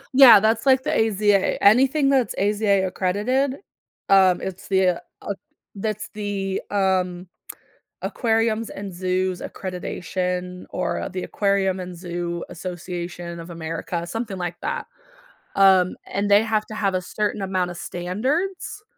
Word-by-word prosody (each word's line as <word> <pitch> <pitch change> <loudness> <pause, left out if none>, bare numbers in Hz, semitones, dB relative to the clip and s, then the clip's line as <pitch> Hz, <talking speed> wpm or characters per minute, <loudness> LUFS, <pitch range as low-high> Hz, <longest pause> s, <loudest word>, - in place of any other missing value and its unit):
Yeah, 245 -6 +10
that's 220 +4 +1
like 260 0 +5
the - - -1
AZA. 205 -2 +2
Anything 270 +7 +5
that's 265 -3 +2
AZA 200 -1 +2
accredited, 225 +10 0 0.5
um, 190 -2 +5
it's 190 0 -6
the 190 -2 +2 0.2
uh, 200 - -2 0.4
that's 215 +1 -3
the, 200 -2 -3
um, 185 -2 0 0.8
Aquariums 225 -1 0
and 195 -1 -7
Zoos 185 0 -1
Accreditation 180 0 -4
or - - -2
the 185 0 -4
Aquarium 195 -2 0
and 180 -1 -7
Zoo 175 -1 -4
Association 175 -1 -6
of 165 +1 -9
America, 165 +1 -4
something 215 +2 -4
like 175 -1 -4
that, - - -3 0.7
um, 190 -2 +5
and 205 +1 -2
they 205 +1 +7
have 220 -1 0
to 215 - -8
have 200 -3 0
a 185 - 0
certain 210 +2 -2
amount 185 -2 -1
of 175 - -7
standards. 265 - -3
195 Hz, 135 wpm, -23 LUFS, 180-215 Hz, 0.8 s, Yeah